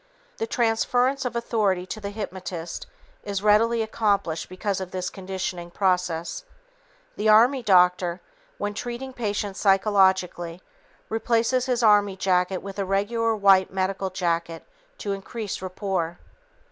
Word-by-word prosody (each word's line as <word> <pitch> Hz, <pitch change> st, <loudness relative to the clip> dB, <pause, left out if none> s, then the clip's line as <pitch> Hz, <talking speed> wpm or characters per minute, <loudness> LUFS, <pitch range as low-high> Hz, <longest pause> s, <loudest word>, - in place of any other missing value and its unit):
The 450 Hz, -, -2 dB
transference 245 Hz, -, +1 dB
of 250 Hz, -, -3 dB
authority 210 Hz, -6 st, 0 dB
to 215 Hz, +3 st, -6 dB
the 200 Hz, -, -4 dB
hypnotist 185 Hz, -5 st, -6 dB, 0.4 s
is 200 Hz, -1 st, -3 dB
readily 225 Hz, +2 st, +4 dB
accomplished 200 Hz, -7 st, -1 dB
because 190 Hz, +1 st, -2 dB
of 185 Hz, -, -5 dB
this 185 Hz, -1 st, -4 dB
conditioning 185 Hz, -2 st, -5 dB
process. 180 Hz, -, -1 dB, 0.7 s
The 215 Hz, +1 st, +1 dB
army 240 Hz, +5 st, +6 dB
doctor, 180 Hz, -4 st, +3 dB, 0.4 s
when 205 Hz, -, -3 dB
treating 245 Hz, +4 st, -5 dB
patients 205 Hz, -4 st, -3 dB
psychologically, 190 Hz, -3 st, +2 dB, 0.4 s
replaces 230 Hz, +3 st, +1 dB
his 245 Hz, -2 st, 0 dB
army 205 Hz, -2 st, +4 dB
jacket 185 Hz, -1 st, +1 dB
with 195 Hz, 0 st, -7 dB
a -, -, +1 dB
regular 220 Hz, +4 st, 0 dB
white 195 Hz, -2 st, +4 dB
medical 190 Hz, 0 st, -1 dB
jacket 170 Hz, -3 st, -2 dB, 0.3 s
to 205 Hz, -, -4 dB
increase 200 Hz, +1 st, -5 dB
rapport. 185 Hz, -2 st, -3 dB
195 Hz, 125 wpm, -25 LUFS, 185-225 Hz, 0.7 s, army